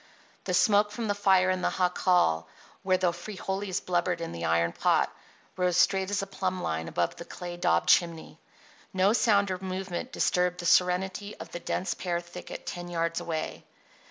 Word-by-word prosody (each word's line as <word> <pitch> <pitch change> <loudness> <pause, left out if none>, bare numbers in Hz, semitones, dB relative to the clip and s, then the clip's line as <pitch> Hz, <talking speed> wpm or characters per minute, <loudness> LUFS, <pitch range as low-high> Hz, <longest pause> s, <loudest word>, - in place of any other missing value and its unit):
The - - 0
smoke 210 -2 +4
from 220 +2 -4
the 205 - +2
fire 190 -2 +3
in 185 -1 -1
the - - 0
jacal, 180 - +2 0.3
where 185 -1 +2
the 180 -2 +1
frijoles 195 -1 -4
blubbered 175 -1 0
in 165 - -4
the 85 0 -4
iron 85 +1 +2
pot, - - +1 0.4
rose 180 -1 +1
straight 190 +1 +3
as 205 -1 0
a - - -3
plumb 185 -2 -3
line 80 +1 -2
above 85 0 -1
the - - -7
clay 175 0 -7
daubed 85 - +1
chimney. 165 -2 +2 0.5
No 190 +2 +3
sound 200 -4 +3
or 185 - -3
movement 190 +4 -4
disturbed 180 -1 +1
the 175 - -5
serenity 185 +3 +2
of - - -10
the 175 - -5
dense 180 - -2
pear 175 -2 -2
thicket 175 +1 -9
ten 175 0 -5
yards 165 -1 -1
away. 160 -2 -4
180 Hz, 180 wpm, -28 LUFS, 170-190 Hz, 0.5 s, smoke